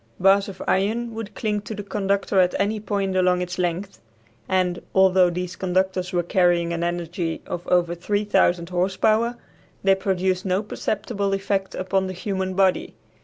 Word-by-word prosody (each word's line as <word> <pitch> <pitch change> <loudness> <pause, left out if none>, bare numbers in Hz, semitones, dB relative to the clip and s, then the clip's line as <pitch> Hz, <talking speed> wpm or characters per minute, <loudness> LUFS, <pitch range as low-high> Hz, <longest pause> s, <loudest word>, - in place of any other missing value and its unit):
Bars 195 +2 +4
of 190 - -8
iron 225 +5 0
would 220 -2 -7
cling 210 -2 -1
to 215 +1 -7
the 205 - -6
conductor 200 -1 0
at 180 -1 +3
any 210 +2 0
point 200 -2 -2
along 180 -1 +3
its 180 +1 -6
length, 180 +2 -2 0.5
and, 185 -2 +1
although 190 -1 +5
these 180 +1 -4
conductors 185 0 0
were 175 -1 +1
carrying 175 -1 +2
an 170 0 -2
energy 175 -1 -2
of 175 - -6
over 175 -1 +2
3000 190 -2 +1
horse 185 +1 -1
power, 230 +2 +2 0.5
they 195 0 +5
produced 190 -1 0
no 190 +2 0
perceptible 205 -1 -2
effect 195 0 -2
upon 190 +1 0
the 185 - -4
human 190 0 -3
body. 190 -1 +1
190 Hz, 165 wpm, -23 LUFS, 180-200 Hz, 0.5 s, although